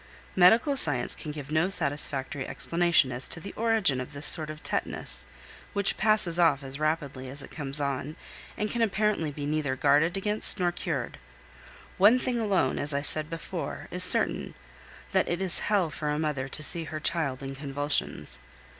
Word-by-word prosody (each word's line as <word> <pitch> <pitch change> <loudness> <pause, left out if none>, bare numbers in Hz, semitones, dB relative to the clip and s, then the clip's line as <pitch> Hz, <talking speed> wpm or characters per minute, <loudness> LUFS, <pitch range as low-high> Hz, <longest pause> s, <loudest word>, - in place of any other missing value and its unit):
Medical 225 +10 +4
science 145 - +4
can 150 - -8
give 145 -1 -9
no 160 +4 +1
satisfactory 145 -4 +1
explanation 170 -6 +1
as 125 +1 +4
to - - -6
the 200 - -9
origin 220 - 0
of 130 - -9
this 145 +1 -2
sort 155 -1 +5
of 155 0 -9
tetanus, 65 0 -1 0.5
which 200 -1 +1
passes 190 -5 +3
off 160 -5 +2
as 135 +1 -8
rapidly 150 -4 -3
as 140 +2 -5
it - - -13
comes 145 -1 -3
on, 140 +1 -4 0.4
and 210 0 -3
can 235 - -3
apparently 210 -6 0
be 145 0 -7
neither 145 -3 -2
guarded 150 +6 +2
against 210 +1 +2
nor 175 -1 +1
cured. 175 - -5 0.8
One 210 +6 +6
thing 250 -1 -2
alone, 195 - 0
as 145 0 +1
I 140 - -1
said 155 +1 -1
before, 165 -1 -7
is - - +6
certain, - - +3 0.6
that - - +1
it 175 - -2
is 190 -3 +2
hell 195 -6 +1
for 150 -1 -5
a 150 - -1
mother 150 -4 -3
to 155 - -4
see 165 +2 +3
her 155 0 -6
child 150 -5 -2
in 135 0 -6
convulsions. 140 - -2
155 Hz, 180 wpm, -27 LUFS, 140-185 Hz, 0.8 s, One